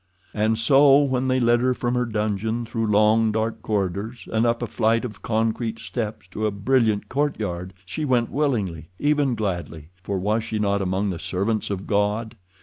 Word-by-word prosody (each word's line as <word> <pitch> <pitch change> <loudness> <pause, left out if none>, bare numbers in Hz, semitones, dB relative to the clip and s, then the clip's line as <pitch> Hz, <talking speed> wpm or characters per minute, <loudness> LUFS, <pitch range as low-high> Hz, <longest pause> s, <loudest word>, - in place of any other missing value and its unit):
And 110 +1 +1
so 135 +4 +6
when 130 -2 0
they 130 0 +2
led 120 -1 +3
her 125 +1 +1
from 120 0 -1
her 125 -1 0
dungeon, 110 +1 -1
through 115 -1 -2
long, 110 +1 +4
dark 110 +1 -2
corridors, 105 +3 -3
and 110 +2 +3
up 120 +1 0
a - - +1
flight 115 +1 +1
of 105 -4 -8
concrete 115 0 -1
steps 110 -3 -5
to 110 +3 -1
a - - +1
brilliant 110 0 +1
courtyard, 100 -11 -2
she 155 +11 -4
went 125 -5 +1
willingly, 105 - -1
even 145 -2 +1
gladly—for 90 -2 -4
was 105 +4 0
she 110 - -3
not 100 -1 +1
among 95 +2 0
the 85 - -5
servants 105 +4 -1
of 100 -2 -4
God? 105 +3 0
110 Hz, 175 wpm, -23 LUFS, 100-120 Hz, -, so